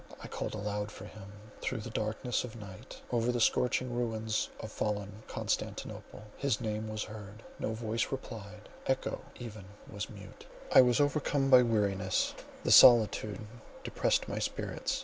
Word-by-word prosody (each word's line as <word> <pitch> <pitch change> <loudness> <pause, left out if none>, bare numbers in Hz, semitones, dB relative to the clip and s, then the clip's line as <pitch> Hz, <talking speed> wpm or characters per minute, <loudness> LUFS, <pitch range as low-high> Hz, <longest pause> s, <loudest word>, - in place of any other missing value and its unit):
I - - -8
called - - -4
aloud 105 0 -3
for 100 - -10
him—through 105 +3 -7
the 115 - -7
darkness 110 +3 -1
of 120 -3 -7
night, 100 -5 -10
over 120 0 +2
the 120 - -1
scorching 125 +2 +2
ruins 110 -2 -1
of 110 - -7
fallen 105 0 -3
Constantinople, 105 - -4
his 135 -6 0
name 110 -1 -3
was 110 0 -3
heard; 105 0 -10 0.2
no 110 - -2
voice 115 0 -1
replied—echo 110 0 -4 0.2
even 110 -5 -8 0.2
was 105 0 -5
mute. 100 -1 -12 0.3
I - - +10
was 125 0 +3
overcome 145 -1 +1
by 130 -1 +10
weariness; 100 -5 +1 0.3
the - - +1
solitude 110 -3 +7 0.4
depressed - - +1
my - - -3
spirits. - - -2
110 Hz, 145 wpm, -32 LUFS, 105-120 Hz, 0.4 s, I